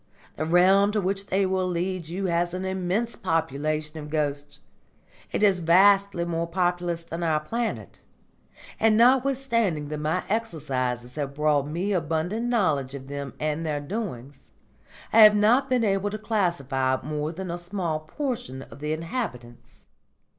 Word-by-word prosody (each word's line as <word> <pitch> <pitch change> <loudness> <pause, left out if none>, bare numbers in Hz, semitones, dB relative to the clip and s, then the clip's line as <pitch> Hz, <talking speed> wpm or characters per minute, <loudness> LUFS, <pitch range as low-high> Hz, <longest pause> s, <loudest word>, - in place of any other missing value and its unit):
The 155 - -3
realm 190 +4 +5
to 215 - +1
which 195 +1 -2
they 195 +1 +1
will 185 0 0
lead 180 -1 -2
you 185 +4 -3
has 175 0 0
an 185 +1 -4
immense 190 +5 -1
population 155 0 -2
of 150 0 -8
ghosts; 145 -2 -2 0.7
it - - -1
is 195 -3 +4
vastly 190 +1 +4
more 170 0 -2
populous 175 -1 -1
than 165 +1 -6
our 160 -2 +1
planet; 230 +9 -4 0.8
and 220 -1 +4
notwithstanding 240 - +2
that 150 0 -4
my 155 +4 -1
exercises 130 - -2
have 140 -2 -3
brought 150 -1 +2
me 175 +7 -2
abundant 175 +7 -1
knowledge 150 - +1
of 135 0 -9
them 140 -1 -6
and 155 +1 -1
their 150 -2 -1
doings, 145 - -6 0.6
I 225 - +6
have 210 -1 +9
not 240 +6 +3
been 250 -2 +2
able 200 -1 +1
to 215 - -4
classify 140 - 0
more 150 +1 -3
than 180 +1 -6
a 175 - -4
small 175 -3 -2
portion 155 - -5
of - - -14
the 150 +1 -2
inhabitants. 155 - -6
170 Hz, 155 wpm, -25 LUFS, 150-200 Hz, 0.8 s, have